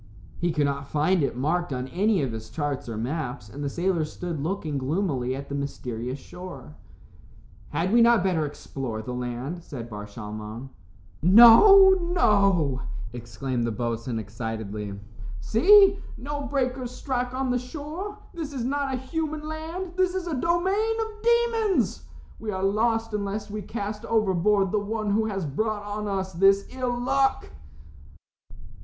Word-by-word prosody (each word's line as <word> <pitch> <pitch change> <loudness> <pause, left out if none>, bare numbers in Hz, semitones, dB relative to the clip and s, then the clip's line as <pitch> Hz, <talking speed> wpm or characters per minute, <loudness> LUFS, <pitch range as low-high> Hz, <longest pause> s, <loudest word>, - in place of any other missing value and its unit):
He 175 0 +1
could 150 -2 +1
not 140 0 -2
find 155 +5 +2
it 135 -4 -1
marked 165 +5 0
on 125 -1 -3
any 195 - +1
of 130 - -2
his 110 0 -7
charts 140 0 -3
or 110 - -4
maps, 125 -1 -4
and 145 +7 -7
the 140 - -1
sailors 170 -1 -1
stood 170 -5 -5
looking 155 -3 -2
gloomily 135 -3 -1
at 140 +1 -7
the - - -7
mysterious 125 -3 -4
shore. 180 - -10 1.0
"Had 170 +7 -1
we 235 - +6
not 235 -4 +5
better 180 -5 +1
explore 135 -6 -5
the 125 - -5
land?" 125 +7 -4
said 120 -7 -8
Bar 105 0 -6
Shalmon. 105 +3 -7 0.5
"No, 240 - +9 0.2
no," 195 - +3 0.3
exclaimed 120 +1 -3
the 115 - 0
boatswain, 115 +1 -3
excitedly. 105 -2 -5 0.4
"See, 390 - +6 0.2
no 285 +1 -4
breakers 255 -2 -1
strike 250 0 -3
on 260 -1 0
the 250 - +1
shore. 310 +10 -6 0.2
This 315 -4 -5
is 255 -4 -3
not 275 +1 -1
a - - -2
human 305 +3 -4
land. 325 +4 -5
This 370 0 +2
is 375 -2 -2
a 340 - -3
domain 375 - +1
of 440 -1 -4
demons. 465 -3 +2 0.3
We 220 - -5
are 190 -2 -2
lost 225 +2 +1
unless 205 0 -3
we 210 0 -4
cast 210 0 -5
overboard 200 -2 +2
the 210 - +2
one 210 0 -2
who 220 +2 +2
has 195 -5 -2
brought 210 +9 -2
on 210 +1 -4
us 190 -1 -2
this 195 +3 +4
ill 250 -2 -2
luck." 270 +2 +1
195 Hz, 155 wpm, -26 LUFS, -, 1.0 s, No